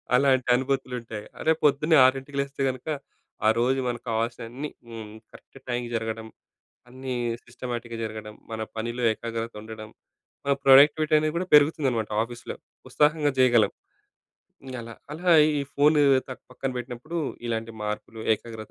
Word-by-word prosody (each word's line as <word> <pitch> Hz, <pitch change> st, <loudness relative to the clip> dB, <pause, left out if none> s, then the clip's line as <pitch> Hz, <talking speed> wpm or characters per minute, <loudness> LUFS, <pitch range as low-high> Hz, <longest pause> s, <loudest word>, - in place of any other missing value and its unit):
అలాంటి 130 Hz, -1 st, +3 dB
అనుభూతులుంటాయి. 125 Hz, -4 st, -3 dB
అదే 160 Hz, -, +2 dB
పొద్దున్నే 150 Hz, +3 st, +4 dB
ఆరింటికి 135 Hz, +2 st, 0 dB
లేస్తే, 140 Hz, 0 st, -3 dB
గనక 130 Hz, +3 st, -6 dB, 0.6 s
ఆ -, -, +7 dB
రోజు 130 Hz, +2 st, +2 dB
మనకు 120 Hz, 0 st, -3 dB
కావాల్సినవన్నీ 115 Hz, +5 st, -3 dB, 0.2 s
హ్మ్. 110 Hz, -2 st, -8 dB, 0.2 s
కరెక్ట్ -, -, -16 dB
టైంకి 120 Hz, -1 st, -2 dB
జరగడం 110 Hz, 0 st, -3 dB, 0.6 s
అన్నీ 130 Hz, +1 st, -6 dB, 0.3 s
సిస్టమాటిక్‌గా 120 Hz, -1 st, -6 dB
జరగడం, 110 Hz, -1 st, -6 dB, 0.2 s
మన 110 Hz, -, -4 dB, 0.2 s
పనిలో 120 Hz, +2 st, -3 dB
ఏకాగ్రత 115 Hz, +1 st, -4 dB
ఉండడం, 110 Hz, 0 st, -9 dB, 0.6 s
మన 140 Hz, -, +3 dB
ప్రొడక్టివిటీ 145 Hz, +3 st, +6 dB
అనేది 155 Hz, 0 st, -1 dB
కూడా 185 Hz, -, -2 dB
పెరుగుతుందనమాట 140 Hz, -7 st, +4 dB
ఆఫీస్‌లో. 120 Hz, 0 st, -8 dB, 0.3 s
ఉత్సాహంగా 150 Hz, -1 st, +2 dB
చేయగలం. 120 Hz, -4 st, +5 dB, 1.1 s
అలా, 115 Hz, 0 st, -9 dB, 0.2 s
అలా 175 Hz, +3 st, 0 dB, 0.3 s
ఈ -, -, 0 dB
ఫోను 150 Hz, +1 st, +4 dB, 0.3 s
త -, -, -11 dB, 0.2 s
పక్కన 130 Hz, +1 st, -4 dB
పెట్టినప్పుడు 125 Hz, +6 st, -6 dB, 0.3 s
ఇలాంటి 115 Hz, -1 st, -3 dB
మార్పులు, 105 Hz, +1 st, -5 dB
ఏకాగ్రత 110 Hz, -1 st, -10 dB
125 Hz, 130 wpm, -26 LUFS, 115-140 Hz, 1.1 s, ఆ